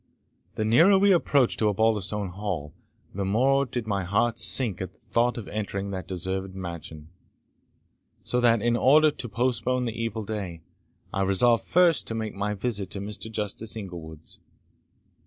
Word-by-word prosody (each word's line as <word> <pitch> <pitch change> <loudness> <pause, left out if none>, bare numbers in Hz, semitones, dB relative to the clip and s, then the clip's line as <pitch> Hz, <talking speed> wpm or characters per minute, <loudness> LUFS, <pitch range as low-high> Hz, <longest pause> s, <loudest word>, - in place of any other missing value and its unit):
The 110 - -1
nearer 165 - +6
we 200 +1 +4
approached 145 -8 +2
to 110 - +2
Osbaldistone 105 -1 0
Hall, 90 -7 -4 0.4
the 100 - -3
more 130 +8 +2
did 120 -1 -4
my 100 -3 -1
heart 110 +5 0
sink 115 -7 +3
at 95 -1 -5
the - - -31
thought 120 +1 +2
of 115 - -6
entering 100 -2 -4
that 95 -1 -5
deserted 95 +1 -4
mansion; 85 -4 -8 1.1
so 125 - 0
that, 115 -3 +3
in 120 0 +2
order 150 +5 +5
to 125 -4 -5
postpone 125 +2 0
the 115 - -3
evil 110 -1 -3
day, 95 -6 -5 0.5
I 95 - -1
resolved 100 +5 +2
first 175 -3 +3
to 115 - -4
make 110 -1 -3
my 105 +1 -2
visit 105 -2 -3
at 100 - -4
Mr. 105 +2 -5
Justice 105 +1 -4
Inglewood's. 85 -7 -9
105 Hz, 160 wpm, -26 LUFS, 95-120 Hz, 1.1 s, nearer